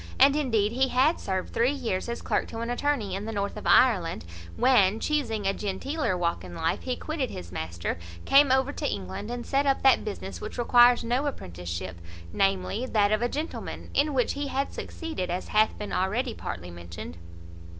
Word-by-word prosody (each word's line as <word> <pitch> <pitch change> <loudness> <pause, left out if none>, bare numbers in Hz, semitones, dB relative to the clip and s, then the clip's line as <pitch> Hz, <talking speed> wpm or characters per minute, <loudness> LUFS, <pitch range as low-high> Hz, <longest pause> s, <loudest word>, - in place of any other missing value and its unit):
(And 275 +2 +7
indeed 225 -8 +1
he 260 +3 +2
had 265 +6 +3
served 190 -1 -3
three 240 +3 +3
years 235 -7 -2
as 235 - -4
clerk - - 0
to 225 - -6
an 235 +1 -2
attorney 245 -6 0
in 195 +2 -3
the 225 - -4
north 200 -1 -2
of 210 - -6
Ireland, 185 - +4 0.3
when, 220 -5 +4
chusing 235 -9 -1
a 195 - +2
genteeler 210 - -2
walk 170 - -1
in 90 -1 -9
life, 165 - -1
he 255 -1 -2
quitted 300 -4 -3
his 85 -1 -8
master, 85 0 -4 0.3
came 275 -1 +6
over 265 +1 +3
to - - -2
England, 100 - -5
and 240 0 -4
set 280 +1 +1
up 275 - +2
that 265 -2 +5
business 200 -2 -6
which 215 - -6
requires 240 0 +5
no 250 +5 0
apprenticeship, 90 - -5 0.3
namely, 195 +5 0
that 210 -4 +2
of 215 +1 +2
a 240 - +1
gentleman, 305 +5 -5
in 290 0 +2
which 250 - +2
he 285 0 -3
had 275 +1 -2
succeeded, 320 - -5
as 180 +2 -3
hath 215 +1 +3
been 210 - -5
already 225 +7 0
partly 90 - -6
mentioned.) 85 -1 -9
225 Hz, 190 wpm, -27 LUFS, 185-265 Hz, 0.3 s, And